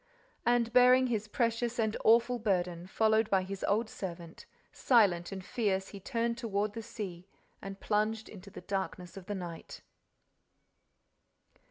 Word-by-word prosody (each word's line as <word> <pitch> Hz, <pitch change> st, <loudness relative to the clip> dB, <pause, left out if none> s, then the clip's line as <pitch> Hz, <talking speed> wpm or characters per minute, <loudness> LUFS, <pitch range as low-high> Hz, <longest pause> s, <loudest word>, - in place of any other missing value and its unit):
And, 240 Hz, -1 st, +2 dB
bearing 250 Hz, +1 st, +6 dB
his 220 Hz, -4 st, -1 dB
precious 235 Hz, +1 st, -1 dB
and 220 Hz, -2 st, 0 dB
awful 235 Hz, +2 st, +4 dB
burden 180 Hz, -5 st, -1 dB
followed 220 Hz, +2 st, +2 dB
by 190 Hz, -1 st, +2 dB
his 195 Hz, +1 st, -6 dB
old 215 Hz, +3 st, +1 dB
servant, 170 Hz, -5 st, -8 dB, 0.2 s
silent 195 Hz, -9 st, +3 dB
and 190 Hz, -1 st, -7 dB
fierce 195 Hz, -5 st, -1 dB
he 200 Hz, -, -9 dB
turned 235 Hz, +3 st, -2 dB
toward 210 Hz, -3 st, -1 dB
the 225 Hz, -, -5 dB
sea 190 Hz, -5 st, -7 dB, 0.3 s
and 195 Hz, 0 st, -8 dB
plunged 215 Hz, +1 st, 0 dB
into 200 Hz, -1 st, -11 dB
the -, -, -10 dB
darkness 190 Hz, -2 st, -4 dB
of 190 Hz, -2 st, -10 dB
the 205 Hz, -, -3 dB
night. 175 Hz, -3 st, -8 dB
210 Hz, 145 wpm, -31 LUFS, 190-230 Hz, 0.3 s, bearing